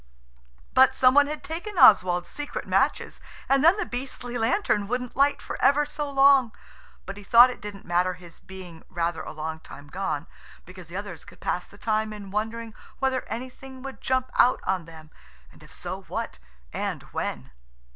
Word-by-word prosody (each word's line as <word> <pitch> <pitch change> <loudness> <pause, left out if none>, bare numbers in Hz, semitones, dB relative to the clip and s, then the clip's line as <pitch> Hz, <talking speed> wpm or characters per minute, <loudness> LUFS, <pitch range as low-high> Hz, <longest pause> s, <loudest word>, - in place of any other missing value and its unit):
But - - +6
some 255 0 +5
one 285 +1 +5
had 300 +1 -5
taken 350 +5 -6
Oswald's 180 - +6
secret 290 +10 -5
matches, - - 0 0.3
and 275 +1 +3
then 335 +5 +6
the 425 - -1
beastly 245 -1 -6
lantern 225 - +1
wouldn't 250 +1 -3
light 280 +1 +2
for - - -6
ever 295 +2 +4
so 295 0 -4
long. 275 -3 +5 0.5
But 195 - -7
he 205 - -10
thought 240 +5 +7
it - - -11
didn't 205 -1 -8
matter 180 +1 +1
his 175 -2 -14
being 185 -4 -11
rather 170 -2 -2
a - - -7
long 160 +1 -5
time 145 -2 -13
gone, 155 -4 -3 0.4
because 185 -1 -12
the 175 +3 -7
others 200 -5 -7
could - - -16
pass 180 - -2
the 200 - -17
time 215 0 -1
in 200 -2 -9
wondering 225 +2 -3 0.2
whether 265 -1 0
anything 260 +3 -8
would 270 -1 -8
jump 260 0 0
out 250 - +5
on 185 -3 -1
them, 160 -1 -14 0.4
and - - -20
if - - -16
so, - - -6
what - - -5 0.3
and - - -3
when. 65 0 -4
220 Hz, 180 wpm, -26 LUFS, 180-265 Hz, 0.5 s, thought